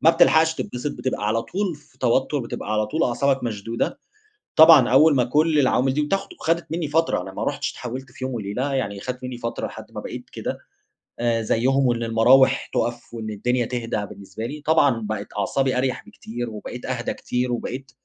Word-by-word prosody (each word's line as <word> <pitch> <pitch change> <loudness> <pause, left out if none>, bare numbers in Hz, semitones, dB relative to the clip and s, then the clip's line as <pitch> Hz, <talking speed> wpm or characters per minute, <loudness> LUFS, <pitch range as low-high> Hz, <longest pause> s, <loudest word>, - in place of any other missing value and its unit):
ما 160 - +8
بتلحقش 160 -1 +4
تتبسط، 125 -1 -4
بتبقى 125 -5 -3
على 115 +1 +1
طول 190 - -2
في 145 -2 -21
توتّر، 130 +4 +1
بتبقى 115 -4 -5
على 105 0 +1
طول 155 +10 -1
أعصابك 135 +2 +1
مشدودة. 115 0 -3 0.6
طبعًا 160 -6 +8
أوّل 145 +4 +6
ما 125 - +4
كل 150 +5 +2
العوامل 130 -1 +2
دي 150 - +1
بتاخد 195 - -2
وخدت 170 - -1
مِنّي 165 -1 -1
فترة، 160 +3 +1
أنا - - -8
ما - - -4
رحتش - - -2
اتحولت 125 +2 -7
في 130 - -9
يوم 130 - -3
وليلة، 120 +5 -2
يعني 100 -7 -2
خدت 125 +4 -6
مِنّي 125 -1 -5
فترة 115 -1 -3
لحد - - -11
ما - - -6
بقيت - - -8
كده - - -4 0.6
آآ، 115 -1 +1
زيهم، 130 +5 +2
وإن 120 -1 0
المراوح 125 +4 +4
تقف 120 0 -2
وإن 110 -2 -5
الدنيا 120 +4 0
تهدا 115 -3 -3
بالنسبة 100 +3 -8
لي، 145 +5 -6
طبعًا 140 -7 +3
بقت 105 -1 -3
أعصابي 130 +6 +1
أريح 130 0 -1
بكتير، 120 +1 -6
وبقيت 110 +3 -7
أهدى 125 -2 -2
كتير، 125 0 -2
وبقيت 130 +2 -4
125 Hz, 190 wpm, -23 LUFS, 115-140 Hz, 0.6 s, ما